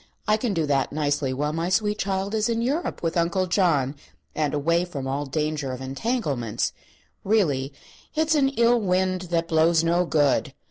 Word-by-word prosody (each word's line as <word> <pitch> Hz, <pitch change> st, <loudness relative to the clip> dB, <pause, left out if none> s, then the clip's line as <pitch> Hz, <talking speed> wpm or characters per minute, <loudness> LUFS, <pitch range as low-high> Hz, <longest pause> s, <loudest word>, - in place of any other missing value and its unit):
I 215 Hz, -, +4 dB
can 215 Hz, -2 st, -2 dB
do 165 Hz, -2 st, +1 dB
that 140 Hz, -2 st, 0 dB
nicely 145 Hz, -2 st, 0 dB
while 150 Hz, +3 st, -1 dB
my 165 Hz, +2 st, -1 dB
sweet 210 Hz, +2 st, +1 dB
child 195 Hz, +1 st, -1 dB
is 220 Hz, +1 st, +1 dB
in 230 Hz, 0 st, 0 dB
Europe 285 Hz, -, -2 dB
with 165 Hz, -, -1 dB
Uncle 175 Hz, +2 st, +1 dB
John, 165 Hz, -7 st, +1 dB, 0.4 s
and 150 Hz, -2 st, 0 dB
away 165 Hz, +4 st, +1 dB
from 145 Hz, -7 st, -6 dB
all 140 Hz, +2 st, -2 dB
danger 150 Hz, -1 st, -2 dB
of 125 Hz, -, -6 dB
entanglements. 135 Hz, -, -2 dB, 0.5 s
Really, 150 Hz, -11 st, +1 dB, 0.4 s
it's 315 Hz, 0 st, +2 dB
an 280 Hz, -3 st, +3 dB
ill 235 Hz, -2 st, +3 dB
wind 185 Hz, -1 st, +1 dB
that 165 Hz, -1 st, 0 dB
blows 165 Hz, +1 st, +3 dB
no 170 Hz, +2 st, +2 dB
good! 145 Hz, -4 st, +1 dB
170 Hz, 175 wpm, -24 LUFS, 145-205 Hz, 0.5 s, I